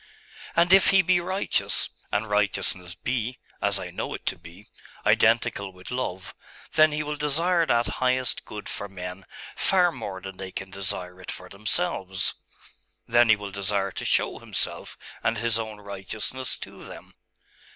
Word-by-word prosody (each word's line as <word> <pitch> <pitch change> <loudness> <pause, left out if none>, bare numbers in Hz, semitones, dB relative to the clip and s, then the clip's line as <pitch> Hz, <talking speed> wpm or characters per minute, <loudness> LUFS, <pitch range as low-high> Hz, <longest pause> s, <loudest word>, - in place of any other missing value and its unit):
'And 175 +2 +5
if 195 - +7
He 195 -1 +6
be 180 0 +4
righteous, 190 +3 +1 0.2
and 105 +2 0
righteousness 95 -3 +1
be 125 +3 -2 0.2
as - - +3
I - - -6
know - - -3
it - - -10
to - - +1
be 85 +4 -13 0.4
identical 110 -3 +3
with 90 +3 -11
love, 95 -8 -3 0.4
then 155 0 +6
He 150 0 -1
will 150 0 -3
desire 165 +4 +2
that 120 0 +3 0.2
highest 130 -2 +1
good 105 -1 -8
for 100 - -4
men 90 0 -7 0.3
far 180 -2 +4
more 100 - -6
than 95 0 -8
they 95 -1 -6
can 95 0 -6
desire 95 -2 -3
it - - -10
for 90 0 -9
themselves.... 95 -2 0 0.7
Then 120 0 +5
He 110 - +8
will 100 -1 -7
desire 100 0 0
to - - -5
show - - +2
Himself - - -3 0.2
and 115 - +1
His 115 0 +2
own 110 -2 -5
righteousness 105 +6 -4
to - - -9
them.... - - -11
105 Hz, 160 wpm, -26 LUFS, 95-130 Hz, 0.7 s, He